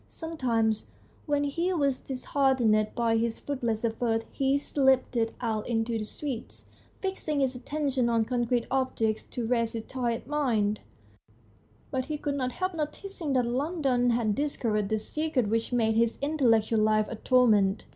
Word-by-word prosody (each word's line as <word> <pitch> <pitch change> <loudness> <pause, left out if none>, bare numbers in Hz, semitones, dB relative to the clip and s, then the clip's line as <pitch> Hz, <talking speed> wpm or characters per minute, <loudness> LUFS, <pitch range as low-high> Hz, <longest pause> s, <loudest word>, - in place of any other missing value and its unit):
Sometimes 235 -9 -1 0.4
when 290 -1 +1
he 335 +6 0
was 280 -6 +1
dis 260 -2 -7
heartened 245 -6 +3
by 230 -1 +2
his 230 0 -1
fruitless 235 -5 -2
efforts 225 0 0
he 270 0 +1
slipped 265 -3 +2 0.2
out 220 -3 -2
into 225 0 0
the 215 - -3
streets, 260 +1 -6 0.4
fixing 380 -6 -2
his 265 -2 +1
attention 265 -1 -1
on 230 -1 +2
concrete 240 0 0
objects 245 -5 0
to 240 - -4
rest 230 -1 +1
his 225 -1 -4
tired 240 -2 -2
mind. 235 -8 +1 1.1
But 260 -2 -1
he 300 +1 -3
could 290 -1 -2
not 255 -3 -2
help 370 0 -2
noticing 320 0 -4
that 250 -2 +2
London 260 -1 +1
had 230 -3 +2
discovered 220 -7 -1
the 220 - +1
secret 260 0 -1
which 225 +2 0
made 225 -2 +2
his 230 +1 +2
intel 285 -3 +1
lectual 225 0 +3
life 215 0 +3
a - - -5
torment. 215 -5 +3
245 Hz, 155 wpm, -28 LUFS, 225-280 Hz, 1.1 s, heartened